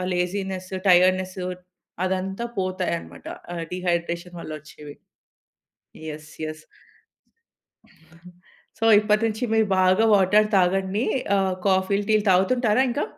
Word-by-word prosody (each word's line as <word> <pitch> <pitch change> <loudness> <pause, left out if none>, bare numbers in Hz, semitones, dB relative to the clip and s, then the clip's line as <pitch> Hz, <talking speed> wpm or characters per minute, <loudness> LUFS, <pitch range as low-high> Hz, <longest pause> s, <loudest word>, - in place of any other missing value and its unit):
Laziness 185 +1 -3 0.2
tiredness 185 +1 +3 0.6
అదంతా 190 +4 -3
పోతాయన్నమాట 85 - -3 0.3
ఆహ్, 170 -1 -4
dehydration 175 -1 -2
వల్లొచ్చేవి. 150 -2 -10 1.1
Yes. 150 0 -9
Yes. 155 0 -7 2.2
So 225 - -2 0.2
ఇప్పటి 210 +1 +1
నుంచి 220 +2 -2
మీరు 220 -1 +3
బాగా 185 +4 +4
వాటర్ 205 +2 +4
తాగండి. 190 +4 +1 0.3
ఆహ్, 190 -1 +1
కాఫీలు, 195 +1 +1
టీలు 215 -1 +3
తాగుతుంటారా 215 +6 +3
ఇంకా? 265 +5 -1
185 Hz, 95 wpm, -23 LUFS, 175-205 Hz, 2.2 s, బాగా